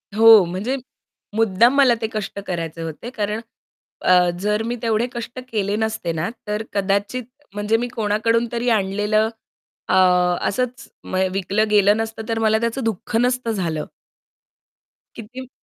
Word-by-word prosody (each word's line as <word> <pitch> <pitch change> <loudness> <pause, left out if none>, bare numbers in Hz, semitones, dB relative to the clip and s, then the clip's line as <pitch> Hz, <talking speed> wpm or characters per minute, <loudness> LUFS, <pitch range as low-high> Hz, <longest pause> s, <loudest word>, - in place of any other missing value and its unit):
हो, 225 -2 +8
म्हणजे 190 +10 -2 0.6
मुद्दाम 225 +3 +3
मला 270 -4 +6
ते 220 - 0
कष्ट 205 -2 -4
करायचे 165 -2 -4
होते. 165 +8 -6
कारण 215 -2 -3 0.6
अ, 180 -1 +5
जर 210 +3 0
मी 240 +1 -2
तेवढे 225 0 +1
कष्ट 240 +2 -6
केले 205 -2 0
नसते 220 -6 -2
ना, 160 +4 -2 0.2
तर 210 +1 -2
कदाचित 200 +5 0 0.3
म्हणजे 210 +2 +1
मी 245 - -2
कोणाकडून 230 0 0
तरी 240 0 -1
आणलेलं 210 +1 +1 0.6
अ, - - +2 0.5
असंच 250 +4 -2 0.2
म - - -6 0.2
विकलं 200 +3 0
गेलं 205 0 +4
नसतं, 225 0 -4
तर 225 0 0
मला 220 0 +3
त्याचं 235 +2 -1
दुःख 225 +2 -3
नसतं 250 -1 0
झालं. 165 -7 -2 1.3
किती 250 +3 -9
220 Hz, 140 wpm, -21 LUFS, 200-230 Hz, 1.3 s, हो